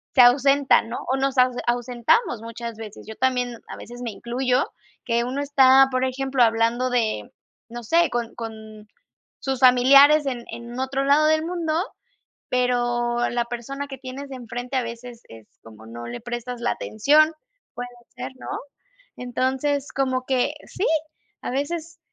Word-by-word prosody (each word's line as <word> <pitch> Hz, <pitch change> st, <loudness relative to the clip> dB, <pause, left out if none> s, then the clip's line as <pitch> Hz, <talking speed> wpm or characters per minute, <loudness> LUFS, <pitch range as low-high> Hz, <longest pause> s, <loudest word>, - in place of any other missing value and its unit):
se 255 Hz, -, +8 dB
ausentan, 275 Hz, 0 st, +5 dB
¿no? 235 Hz, -, -4 dB, 0.2 s
O -, -, +1 dB
nos 270 Hz, 0 st, -1 dB
ause 250 Hz, -1 st, +3 dB
ausentamos 240 Hz, -, +1 dB
muchas 230 Hz, 0 st, -7 dB
veces. 220 Hz, -1 st, -10 dB
Yo 220 Hz, -, -8 dB
también, 250 Hz, -2 st, -1 dB
a -, -, -8 dB
veces 240 Hz, +1 st, -10 dB
me 240 Hz, -, -3 dB
incluyo 250 Hz, +4 st, 0 dB, 0.4 s
que 235 Hz, -1 st, +1 dB
uno 255 Hz, +3 st, -3 dB
está, 270 Hz, -2 st, +6 dB
por 255 Hz, 0 st, 0 dB
ejemplo, 265 Hz, 0 st, -1 dB
hablando 230 Hz, +2 st, +2 dB
de, 220 Hz, -, -1 dB, 0.4 s
no 240 Hz, 0 st, -7 dB
sé, 335 Hz, +8 st, +3 dB
con 235 Hz, -1 st, -3 dB
con 220 Hz, -2 st, -9 dB, 0.5 s
sus 265 Hz, -2 st, -3 dB
familiares 275 Hz, +4 st, +7 dB
en 245 Hz, -3 st, -3 dB
en 235 Hz, +2 st, -7 dB
otro 265 Hz, +1 st, -1 dB
lado 300 Hz, +2 st, +4 dB
del 315 Hz, 0 st, +2 dB
mundo, 335 Hz, -2 st, -2 dB, 0.7 s
pero 240 Hz, -1 st, +1 dB
la 240 Hz, 0 st, 0 dB
persona 275 Hz, +4 st, -6 dB
que 270 Hz, -, -8 dB
tienes 270 Hz, +1 st, -8 dB
enfrente 245 Hz, +1 st, -5 dB
a -, -, +2 dB
veces 235 Hz, 0 st, -8 dB
es 115 Hz, -1 st, -14 dB
como 110 Hz, 0 st, -14 dB
no 120 Hz, +1 st, -8 dB
le 120 Hz, -, -7 dB
prestas 240 Hz, 0 st, -5 dB
la 240 Hz, -, +1 dB
atención, 305 Hz, +8 st, +3 dB, 0.4 s
puede 245 Hz, 0 st, -5 dB, 0.3 s
ser, 255 Hz, 0 st, -6 dB
¿no? -, -, -9 dB, 0.7 s
Entonces, 265 Hz, +3 st, -1 dB
como 260 Hz, -1 st, -1 dB
que 255 Hz, -2 st, +1 dB
sí, 390 Hz, -, -3 dB, 0.6 s
a -, -, -4 dB
veces, 320 Hz, +5 st, -4 dB
250 Hz, 155 wpm, -23 LUFS, 235-270 Hz, 0.7 s, se